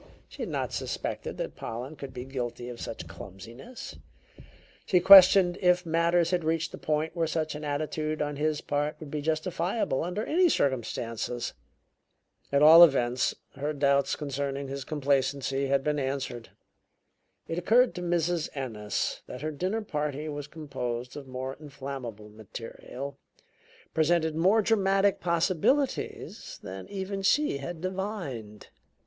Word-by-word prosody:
She - - -11
had - - -3
not - - -2
suspected - - -4
that - - -4
Pollen 125 +7 -6
could 140 -2 -8
be 125 0 -7
guilty 120 -2 -4
of 120 - -8
such 110 - -6
clumsiness; 105 - -10 0.9
she 180 - +3
questioned 185 -1 +8
if 180 -1 +3
matters 170 +1 +2
had 180 -2 +1
reached 165 +1 -1
a - - -7
point 155 +2 -1
where 165 -1 +1
such 155 -1 -1
an 150 0 -7
attitude 155 +1 -2
on 145 -1 -2
his 150 0 0
part 145 +1 -1
would 150 -3 -9
be 150 - -2
justifiable 165 - -1
under 180 +6 -3
any 355 +2 +4
circumstances. 120 - -1 1.0
At 140 +1 +4
all 165 +3 +11
events, 130 -5 +3 0.2
her 145 +3 -3
doubts 140 -1 +2
concerning 140 -1 -3
his 135 0 -4
complacency 140 -1 0
had 135 0 +2
been 150 0 0
answered. 130 -3 -3 1.0
It 165 +1 -2
occurred 235 +7 +4
to 180 - -6
Mrs. 175 -1 0
Ennis 110 -6 -3
that 125 - -8
her 155 - -1
dinner 185 +9 -2
party 150 -4 -3
was 145 -1 -5
composed 125 -6 -5
of 145 -2 -8
more 130 +1 -5
inflammable 135 -7 -7
material, 115 +5 -8 0.7
presented 160 0 +2
more 195 +7 +4
dramatic 195 -2 +3
possibilities, 180 - 0
than 95 0 -8
even 195 0 -4
she 290 - +2
had 160 +4 -6
divined. 180 - -5
150 Hz, 140 wpm, -28 LUFS, 135-175 Hz, 1.0 s, all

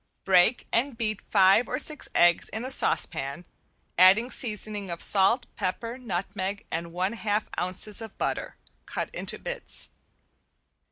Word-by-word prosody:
Break 190 +5 +3
and 245 +1 0
beat 215 -3 -2
five 195 +3 +4
or 250 - -1
six 300 +1 0
eggs 175 -1 +4
in 220 +3 -5
a 260 - +1
saucepan, 140 - 0 0.5
adding 200 +7 +6
seasoning 210 -3 -1
of 170 -1 -5
salt, 210 +5 +4
pepper, 230 +7 -4
nutmeg 195 -2 -4
and 170 +1 -4
one 185 +5 -1
half 215 -2 -2
ounces 185 +4 -1
of 220 -2 -9
butter - - -3 0.3
cut - - -4
into - - -2
bits. - - -2
205 Hz, 135 wpm, -26 LUFS, 185-230 Hz, 0.5 s, adding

